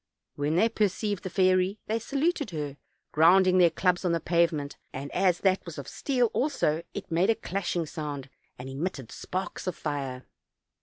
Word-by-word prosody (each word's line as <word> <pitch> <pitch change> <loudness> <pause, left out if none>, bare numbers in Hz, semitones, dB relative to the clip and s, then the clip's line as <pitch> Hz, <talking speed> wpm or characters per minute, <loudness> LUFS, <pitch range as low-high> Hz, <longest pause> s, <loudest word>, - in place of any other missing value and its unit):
When 145 +2 -1
they 215 +6 +5
perceived 210 -2 0
the 185 - -5
fairy 185 +1 +2
they 225 +1 -1
saluted 280 - 0
her, 150 -4 -4 0.3
grounding 185 +4 +5
their 175 -1 +7
clubs 180 +2 +1
on 175 -2 +1
the 165 - +1
pavement; 165 -3 +1 0.2
and 140 +2 -6
as 180 -1 +2
that 190 -1 +2
was 170 -3 -9
of 140 - -6
steel 250 -5 0
also, 205 - +1
it 200 - -6
made 175 +5 +3
a 225 - +4
clashing 175 -4 -2
so:ind, 145 -4 -5 0.3
and 125 - -8
emitted 135 -2 -4
sparks 185 0 -5
of 180 - -1
fire. 135 -4 -4
175 Hz, 170 wpm, -28 LUFS, 150-195 Hz, 0.3 s, their